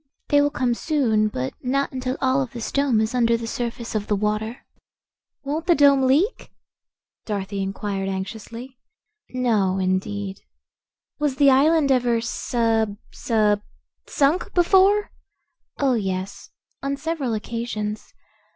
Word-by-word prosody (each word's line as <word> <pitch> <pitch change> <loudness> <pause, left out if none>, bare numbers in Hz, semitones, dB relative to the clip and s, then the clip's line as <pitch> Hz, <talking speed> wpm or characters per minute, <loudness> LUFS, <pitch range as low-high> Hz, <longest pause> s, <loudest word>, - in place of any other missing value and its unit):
"They 290 0 +5
will 290 - +3
come 255 -4 0
soon, 235 -7 +1
but 130 -10 -4
not 275 +2 0
until 255 0 -3
all 260 +1 +2
of 255 -3 -5
this 235 -2 -5
dome 280 -5 +2
is 220 +2 -1
under 235 -2 +3
the 230 - -6
surface 235 0 -4
of 210 -2 -2
the 210 - +1
water." 215 +3 -2 0.8
"Won't 305 +4 -3
the 345 - +5
dome 280 -2 +5
leak?" 320 - +1 0.8
Dorothy 200 -1 -3
inquired 195 0 -3
anxiously. 230 +6 -6 0.5
"No, 220 -7 +1
indeed." 190 +1 -2 0.8
"Was 295 -3 0
the 275 0 +5
island 290 +2 +4
ever 245 -3 +2
sub 225 -2 0
sub 210 -3 +1 0.5
sunk 295 +6 +1
before?" 385 +3 +4 0.7
"Oh, 275 -2 +2
yes; 195 -2 -3 0.3
on 275 0 -2
several 285 -6 -2
occasions. 215 -1 -4
235 Hz, 130 wpm, -23 LUFS, 210-275 Hz, 0.8 s, They